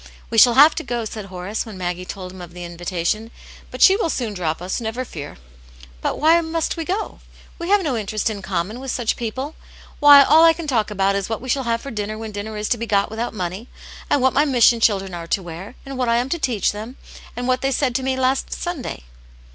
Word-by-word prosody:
" - - -25
We 225 - +4
shall 240 +1 +7
have 295 +3 +8
to - - -4
go," 240 -2 -3
said 215 -1 -6
Horace, 185 +2 -4
when 215 -4 -10
Maggie 180 0 -3
told 185 -1 -7
him 185 0 -11
of 175 0 -11
the 180 - -7
invitation. 175 +5 -3 0.2
" - - -19
But - - 0
she 385 - +8
will 400 -5 0
soon 235 -8 -2
drop 165 -4 -2
us, 185 +6 -3
never 235 +3 -3
fear." 145 -9 -8 0.3
" - - -20
But - - -1
why 325 +3 +5
must 325 0 -2
we 330 -2 -4
go? 395 +6 -3 0.4
We 340 +1 -4
have 405 -1 +4
no 285 -6 -1
interest 215 -1 -2
ia 210 -3 -3
common 190 +4 -3
with 265 0 -7
such 240 -2 0
people. 260 +6 -4 0.5
Why, 290 -1 +9
all 315 +3 +6
I 330 0 +7
can 335 0 -7
talk 230 -8 0
about 195 -1 +1
is 200 0 -2
what 225 - -2
we 255 - -8
shall 265 +1 0
have 230 0 0
for 275 - -7
dinner 215 0 -4
when 220 -1 -6
dinner 210 +1 -6
is 210 0 -2
to 240 - +1
be 230 - -4
got 200 -1 +1
without 225 +1 -4
money, 185 +4 -4 0.4
and 275 - +2
what 260 - +3
my 290 - +4
mission 245 -4 +4
children 195 -4 +1
are 170 -1 -6
to 190 - -1
wear, 175 +7 -9
and 270 -1 -7
what 250 -2 +1
I 230 - +3
am 245 +2 0
to 340 - -1
teach 235 -9 +1
them, 220 +5 -8 0.4
and 245 0 -3
what 255 0 +1
they 270 - +1
said 265 -1 0
to 265 - 0
me 260 0 -1
last 260 +1 0
Sunday." 330 - -5
225 Hz, 255 wpm, -21 LUFS, 195-265 Hz, 0.5 s, Why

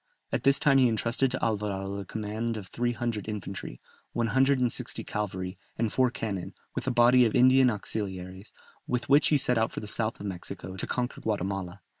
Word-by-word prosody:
At - - 0
this 140 0 +5
time 140 -2 +4
he 130 - +6
entrusted 115 +4 +1
to 130 - -1
Alvarado 100 -3 -2
the 100 - -5
command 110 +3 -3
of 105 - -6
three 120 0 -1
hundred 115 -3 -3
infantry, 95 - -6 0.3
one 115 -1 0
hundred 135 +1 +4
and 125 -2 +2
sixty - - -1
cavalry, 95 -3 -4 0.2
and 110 -1 0
four 130 -1 +3
cannon, 100 -6 -4 0.2
with - - -4
a - - +2
body 120 +1 +6
of 115 - +1
Indian 130 +1 +6
auxiliaries, 95 -3 -5 0.4
with 125 0 -2
which 145 +2 +6
he 150 - +4
set 125 -3 +2
out 110 - +1
for - - -5
the 105 - -7
south 110 +2 -1
of 105 - -7
Mexico, 95 0 -6
to - - -1
conquer 125 0 -2
Guatemala. 95 -2 -3
110 Hz, 200 wpm, -28 LUFS, 100-125 Hz, 0.4 s, he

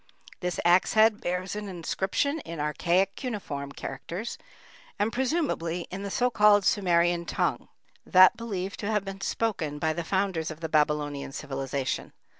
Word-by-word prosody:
This 180 -1 -2
axe 175 +2 +4
head 220 -1 +4
bears 180 +3 -2
an 210 -1 -5
inscription 190 - -1
in 170 - -7
archaic 175 +6 +1
cuneiform 165 - -5
characters, 175 - -6 0.6
and 210 +2 0
presumably 255 - 0
in 190 +2 -5
the 200 - -4
so 250 +5 +1
called 210 -3 +5
Sumerian 175 -3 +3
tongue, - - -1 0.4
that 185 -1 +7
believed 195 -4 -4
to 205 - -3
have 210 -2 0
been 195 0 -7
spoken 185 -9 -1
by 155 +1 0
the 170 +2 -3
founders 190 -2 0
of 155 - -8
the 160 -1 -4
Babylonian 150 -2 0
civilization. 135 -2 -3
185 Hz, 150 wpm, -27 LUFS, 160-205 Hz, 0.6 s, that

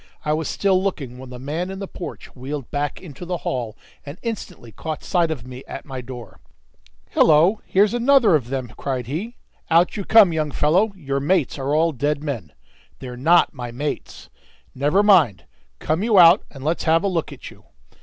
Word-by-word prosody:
I 150 - +1
was 155 0 -2
still 190 -2 +1
looking 140 -10 -4
when 130 -1 -10
the 125 - -8
man 155 +8 -4
in 190 - -6
the 195 0 -6
porch 180 - -9
wheeled 135 +1 -6
back 145 0 -2
into 165 -2 -11
the 175 0 -3
hall, 120 -4 -3 0.3
and 140 +3 -9
instantly 190 - -6
caught 155 +8 -6
sight 175 -3 +1
of 140 -7 -5
me 130 +1 -9
at - - -8
my 130 -3 -6
door. 125 -2 -10 0.7
"Hillo! 165 +7 +4
here's 205 +3 +3
another 240 -4 +4
of 140 -7 +1
them," 130 -2 -4
cried 130 -3 -3
he. 185 - -5 0.3
"Out 170 +2 +3
you 200 - -3
come, 205 -4 +6
young 155 -1 -1
fellow! 175 +10 +2
Your 140 -6 -3
mates 150 -1 0
are 140 +2 -1
all 165 +2 +3
dead 145 +2 -2
men." 120 - -5 0.5
"They're 125 -2 -8
not 165 +8 +3
my 125 -4 -6
mates." 145 +5 -6 0.4
"Never 145 +10 +2
mind; 160 - +4 0.3
come 155 - -1
you 220 -1 +2
out 175 +2 +8
and 135 -2 -12
let's 160 +4 -1
have 165 +2 +3
a - - +1
look 170 -4 -2
at - - -10
you." - - -19
155 Hz, 195 wpm, -22 LUFS, 135-185 Hz, 0.7 s, out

